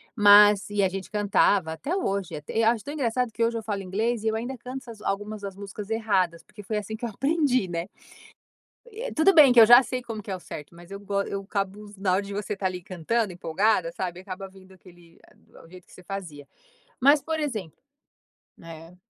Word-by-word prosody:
mas 205 -2 +7
e 205 -1 0
a 190 - +3
gente 190 0 -6
cantava, 205 -4 +2
até 285 - -3
hoje 200 - -2
e 225 - 0
eu 225 - +3
acho 230 -2 -1
tão 285 - -6
engraçado 250 -4 -1
que 230 - -1
hoje 230 0 0
eu 225 - -5
falo 205 -2 -3
inglês 215 +5 -2
e - - -1
eu 220 - +1
ainda 240 +4 -4
canto 250 +2 -7
essas 230 -3 -12
algumas 205 +1 -3
das 200 -1 -6
músicas 200 +1 -8
erradas, 195 -7 0
porque 210 - -13
foi 210 +2 -3
assim 210 +1 -5
que 220 - -13
eu - - -3
aprendi, 275 - +1
né. 170 0 -4 1.0
Eh, 465 +4 -6
tudo 320 +5 +4
bem 300 -6 +8
que 245 - +6
eu 225 - +10
já 240 +3 +8
sei 255 0 -4
como 225 -3 -7
que 200 - -7
é - - -1
o - - -8
certo, 150 -2 -10
mas 175 +1 -15
eu 200 - -6
go 200 0 -1
eu 200 0 -4
acabo, 200 +1 -4
na 190 -1 0
hora 190 - +2
de 200 0 -8
você 205 +1 -3
estar 195 -1 -2
ali 180 -1 -5
cantando, 190 +4 -2
empolgada, 175 +1 0
sabe, 180 0 -5
acaba 190 0 -7
vindo 190 0 -18
aquele, 175 -2 -19
eh, - - -24 0.3
o - - -16
do 165 - -17
jeito 180 0 -14
que - - -22
você - - -14
fazia, 170 -7 -7 0.5
mas 280 +3 +5
por 320 +3 -3
exemplo 220 - -4 0.8
né. 165 +1 -12
205 Hz, 230 wpm, -25 LUFS, 185-230 Hz, 1.0 s, eu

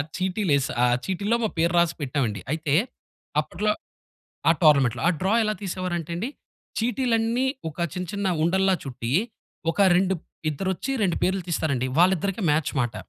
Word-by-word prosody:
ఆ 145 - 0
చీటీలేస్ 185 -7 +1 0.2
ఆహ్, 125 0 +3
చీటీలో 200 +5 0
మా 220 - +2
పేరు 170 +1 +2
రాసి 170 -1 +3
పెట్టాం 140 0 -1
అండి. 105 -2 -5
అయితే 155 -2 0 0.7
అప్పట్లో 195 +8 -1 0.8
ఆ! - - +8
టోర్నమెంట్‌లో. 140 -6 +4
ఆ - - +5
డ్రా 195 +4 +2
ఎలా 215 0 0
తీసేవారు 185 -1 -3
అంటే 165 +1 -6
అండి 225 +9 -2 0.5
చీటీలన్నీ 235 +1 +1 0.2
ఒక 155 - -11
చిన్న 180 0 -4
చిన్న 200 -1 -2 0.2
ఉండల్లా 190 +3 +3
చుట్టి 125 -2 -4 0.6
ఒక 185 - -3 0.2
2 190 +1 +2 0.4
ఇద్దరొచ్చి 190 - -3
2 180 -4 +1
పేర్లు 190 0 +1
తీస్తారండి 140 -6 0
వాళ్ళిద్దరికి 190 +3 +2
మ్యాచ్ 150 0 0
మాట. 120 -2 -1
180 Hz, 155 wpm, -25 LUFS, 150-200 Hz, 0.8 s, ఆ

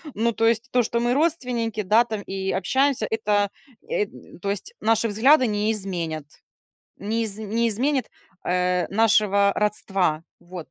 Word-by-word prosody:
ну, 230 +2 +1
то 225 - 0
есть 230 +2 0
то, 245 -1 +3
что 235 +1 -1
мы 240 +1 +1
родственники, 250 -8 -1
да, 220 +5 +4
там, 215 -3 -4
и 190 0 -3
общаемся 265 +4 +1
это, 205 -2 +1 0.4
э, 470 -3 0 0.4
то 200 - -2
есть 200 - -6
наши 225 +1 +2
взгляды 255 +6 +4
не 210 +1 0
изменят, 170 -7 -3 0.8
не 220 +3 -2
из 205 -2 -2
не 220 +2 0
изменят, 260 +5 0 0.4
э, 180 0 +1
нашего 200 -2 +3
родства, 195 -6 0 0.2
вот. 175 -2 -10
215 Hz, 150 wpm, -23 LUFS, 195-235 Hz, 0.8 s, да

